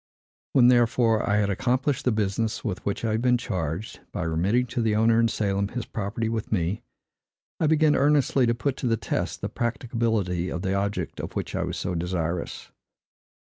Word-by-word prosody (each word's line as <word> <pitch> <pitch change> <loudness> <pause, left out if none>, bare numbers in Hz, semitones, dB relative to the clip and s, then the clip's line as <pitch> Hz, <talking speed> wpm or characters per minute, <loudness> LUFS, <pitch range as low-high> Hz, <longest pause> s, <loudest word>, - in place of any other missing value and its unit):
When, 125 -2 +6
therefore, 120 -2 +3
I 100 - +3
had 100 -1 +2
accomplished 130 +6 0
the 125 - +3
business 110 +2 -1
with 100 -5 -3
which 100 +3 -2
I 110 - +1
had 110 +1 0
been 125 0 +3
charged, 90 -2 -4
by - - -3
remitting 90 +10 +1
to 120 - 0
the 110 -2 +1
owner 115 +1 +4
in 115 - +4
Salem 100 -3 0
his 120 +2 -5
property 110 +2 -3
with 110 -1 -3
me, 90 -1 0 0.8
I 160 - +2
began 155 -1 +4
earnestly 140 -3 +3
to 115 - +2
put 135 +2 -2
to 125 - -2
the 115 -1 +2
test 100 - -3
the - - -1
practicability 115 -7 -1
of 85 - -4
the 95 - 0
object 100 +1 -2
of - - -5
which - - -4
I - - -1
was - - -3
so 90 - -2
desirous. 85 0 -3
110 Hz, 190 wpm, -26 LUFS, 100-120 Hz, 0.8 s, When